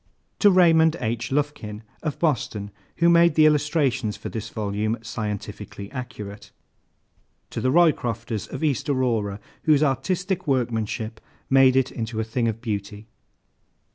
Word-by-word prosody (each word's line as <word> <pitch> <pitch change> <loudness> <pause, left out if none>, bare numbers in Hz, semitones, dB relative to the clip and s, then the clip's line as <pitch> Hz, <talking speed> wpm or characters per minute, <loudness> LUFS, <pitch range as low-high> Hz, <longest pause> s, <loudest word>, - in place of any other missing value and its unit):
To 205 - +6
RAYMOND 165 -4 +5
H. 115 0 -2
LUFKIN, 130 -7 -2 0.2
of 155 -3 -3
Boston, 110 -9 -1 0.2
who 170 - +3
made 170 -2 +5
the 155 - +6
illustrations 145 -7 +1
for - - -6
this 110 -2 -5
volume 105 +1 -2
scientifically 105 -3 -6
accurate. 105 -7 -7 1.0
To - - -4
THE 130 - +1
ROYCROFTERS, 120 - +1
of 135 - -6
East 145 -2 0
Aurora, 115 -7 0 0.3
whose 155 -2 +4
artistic 175 +7 -1
workmanship 115 -3 -1 0.3
made 135 -1 +6
it 130 0 +2
into 110 -1 -4
a - - +1
thing 115 +2 -1
of 115 0 -3
beauty. 105 -1 -5
125 Hz, 135 wpm, -24 LUFS, 110-150 Hz, 1.0 s, To